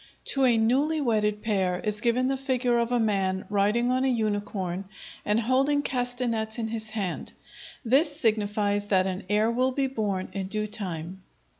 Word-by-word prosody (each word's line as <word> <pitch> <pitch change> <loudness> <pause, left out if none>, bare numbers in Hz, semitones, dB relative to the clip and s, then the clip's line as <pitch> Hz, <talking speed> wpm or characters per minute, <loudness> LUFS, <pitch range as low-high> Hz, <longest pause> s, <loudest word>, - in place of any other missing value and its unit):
To 270 -1 +3
a 240 -3 +4
newly 275 +8 +2
wedded 210 -5 0
pair 190 -5 0
is 210 -1 -1
given 240 +2 +2
the 270 +1 +1
figure 255 -3 0
of 235 +1 -1
a 245 - +2
man 195 -4 0
riding 210 +5 +2
on 255 +1 +1
a - - +2
unicorn 205 -5 -2 0.4
and 210 +2 +1
holding 270 +5 +2
castanets 245 -4 -1
in 225 -1 -2
his 220 -1 -4
hand; 205 -5 -4 0.5
this 290 +5 +3
signifies 205 -3 +1
that 190 -2 +2
an 190 0 -3
heir 215 +2 +2
will 255 +2 +1
be 275 +1 0
born 210 -8 -2
in 195 -1 -3
due 215 +2 -1
time. 185 -3 -5
220 Hz, 170 wpm, -26 LUFS, 205-250 Hz, 0.5 s, a